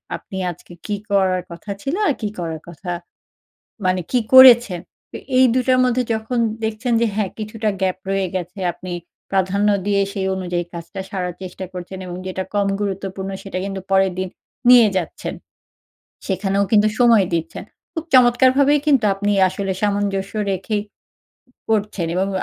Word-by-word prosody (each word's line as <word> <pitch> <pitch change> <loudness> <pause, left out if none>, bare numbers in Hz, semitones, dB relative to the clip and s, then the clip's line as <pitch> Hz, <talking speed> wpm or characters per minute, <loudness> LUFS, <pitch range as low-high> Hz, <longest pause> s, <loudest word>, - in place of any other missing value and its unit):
আপনি 190 - -9
আজকে 175 +1 -14
কী 205 - -1 0.2
করার 190 -2 +2
কথা 170 +4 -10
ছিল 280 +6 -2
আর 295 - +3
কি 210 - -1
করার 165 -2 -4
কথা 175 +2 -7 1.0
মানে 185 0 +2
কি 250 - +4 0.2
করেছেন। 240 -8 +8 0.3
তো - - -6 0.2
এই 260 - +7
দুটার 255 0 +2
মধ্যে 250 0 +2
যখন 220 +3 -3 0.3
দেখছেন 225 +3 -2
যে 235 - +4
হ্যাঁ 205 -3 -1
কিছুটা 215 0 -3
গ্যাপ 185 -1 0
রয়ে 195 -1 +1
গেছে। 180 +2 -5
আপনি 180 +1 -8 0.4
প্রাধান্য 195 +2 +1 0.2
দিয়ে 200 -1 +2
সেই 195 -2 -2
অনুযায়ী 175 -2 -2
কাজটা 170 +4 -7
সারার 180 -3 -3
চেষ্টা 185 +1 -7
করছেন 180 +1 -7
এবং 175 - -6
যেটা 190 0 -3
কম 200 -1 +2
গুরুত্বপূর্ণ 195 -1 -3
সেটা 195 -2 -5
কিন্তু 195 -1 -4
পরের 190 -1 +3
দিন 185 - -2 0.4
নিয়ে 240 -3 +8
যাচ্ছেন। 170 - -5 0.9
সেখানেও 195 +1 0
কিন্তু 215 0 +5
সময় 230 -5 +6
দিচ্ছেন। 165 -1 -3 0.3
খুব 325 -2 -4
চমৎকারভাবেই 260 +3 +5
কিন্তু 275 -6 +4
আপনি 205 +1 0 0.2
আসলে 195 +1 -3
সামঞ্জস্য 200 -1 -1 0.2
রেখেই 205 +3 -2 0.9
করছেন। 205 -5 0
এবং 190 +1 +1
195 Hz, 150 wpm, -20 LUFS, 185-220 Hz, 1.0 s, করেছেন